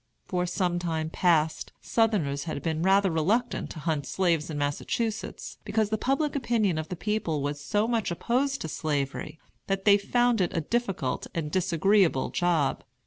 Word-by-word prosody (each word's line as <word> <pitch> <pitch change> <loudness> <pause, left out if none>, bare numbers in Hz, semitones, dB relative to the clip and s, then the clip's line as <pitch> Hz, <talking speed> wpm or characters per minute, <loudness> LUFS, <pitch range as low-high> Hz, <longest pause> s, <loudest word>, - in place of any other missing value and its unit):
For 180 -1 -1
some 175 -1 0
time 160 -2 -2
past, 160 -4 +1
Southerners 175 -12 +1
had 155 - -4
been 160 -1 -1
rather 195 +1 +4
reluctant 205 +10 0
to - - -9
hunt 155 -3 -1
slaves 170 -4 +1
in 155 - -4
Massachusetts, 205 +10 -3
because 215 -1 0
the - - +3
public 280 +3 0
opinion 225 - +1
of 155 - -5
the 180 - -3
people 175 -7 -1
was 145 0 -3
so 210 +8 +1
much 230 -3 0
opposed 255 +10 0
to - - -3
Slavery, 145 0 -3 0.3
that 195 0 -1
they 205 -1 +6
found 240 +1 +2
it 180 0 0
a - - +2
difficult 195 - -2
and 155 -3 -2
disagreeable 185 -3 +2
job. 165 -6 +1
180 Hz, 165 wpm, -27 LUFS, 155-215 Hz, 0.3 s, they